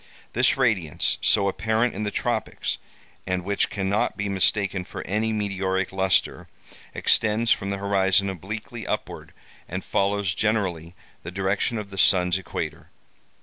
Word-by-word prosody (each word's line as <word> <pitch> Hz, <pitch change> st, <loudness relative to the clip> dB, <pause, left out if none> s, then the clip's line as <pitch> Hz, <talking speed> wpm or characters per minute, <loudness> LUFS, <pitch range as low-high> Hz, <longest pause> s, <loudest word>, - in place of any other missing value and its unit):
This -, -, +3 dB
radiance, 110 Hz, -, +1 dB
so 100 Hz, -2 st, +3 dB
apparent 110 Hz, +4 st, +1 dB
in -, -, -5 dB
the 105 Hz, -, 0 dB
tropics, -, -, -2 dB, 0.5 s
and 90 Hz, -1 st, -1 dB
which 100 Hz, +2 st, +1 dB
cannot 100 Hz, 0 st, 0 dB
be 105 Hz, 0 st, -2 dB
mistaken 100 Hz, 0 st, +1 dB
for -, -, -8 dB
any 110 Hz, +3 st, 0 dB
meteoric 95 Hz, -3 st, -1 dB
lustre, 95 Hz, -1 st, +1 dB, 0.5 s
extends 110 Hz, +1 st, +2 dB
from 100 Hz, -, +2 dB
the 100 Hz, -, -1 dB
horizon 100 Hz, 0 st, +2 dB
obliquely 105 Hz, +4 st, -6 dB
upward, -, -, -4 dB, 0.4 s
and 95 Hz, +2 st, -4 dB
follows 100 Hz, -2 st, +1 dB
generally 90 Hz, -5 st, -1 dB, 0.3 s
the -, -, -7 dB
direction 95 Hz, +5 st, 0 dB
of 105 Hz, -2 st, -6 dB
the 95 Hz, -, -5 dB
sun's 90 Hz, 0 st, +4 dB
equator. 95 Hz, -, -5 dB
100 Hz, 140 wpm, -25 LUFS, 95-105 Hz, 0.5 s, sun's